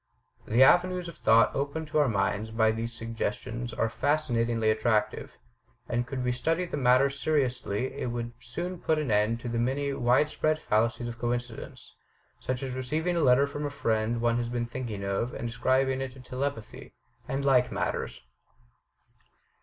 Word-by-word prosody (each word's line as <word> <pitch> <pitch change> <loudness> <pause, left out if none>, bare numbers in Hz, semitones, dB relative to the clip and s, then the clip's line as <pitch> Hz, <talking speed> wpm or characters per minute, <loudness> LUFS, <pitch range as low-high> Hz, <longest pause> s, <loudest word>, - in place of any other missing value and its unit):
The 120 +4 +5
avenues 180 +4 +4
of 170 -2 -9
thought 115 -4 +4
opened 145 +3 -2
to 155 - +1
our 145 - +4
minds 105 0 0
by 110 0 +3
these 115 +1 -3
suggestions 115 +1 -4
are 115 0 0
fascinatingly 115 -4 +1
attractive, 110 0 0 0.5
and 120 +1 -1
could 130 0 -3
we 125 - +1
study 165 +8 0
the 170 - -5
matter 130 0 +4
seriously 130 -5 -1
it - - -4
would 120 0 -4
soon 175 +8 -5
put 160 - +1
an 150 -6 -1
end 105 +3 +2
to 120 - -5
many 130 +5 0
wide 125 +3 +3
spread 155 +1 0
fallacies 115 -2 0
of 120 0 -7
coincidence 120 -1 -4 0.2
— - - -38
such 130 0 -3
as 130 -1 -3
receiving 155 +7 -1
a - - +1
letter 135 0 +5
from 145 +1 -5
a 145 - -1
friend 115 -3 0
one 120 0 +2
has 120 -1 -2
been 120 -1 -1
thinking 115 -4 -5
of 100 +5 -2
and 120 - -4
ascribing 130 +2 +1
it 135 -1 -4
to 135 - -14
telepathy 130 -1 -5
— - - -34
and 140 +1 -1
like 125 -2 +4
matters. - - -3
125 Hz, 175 wpm, -28 LUFS, 115-140 Hz, 0.5 s, The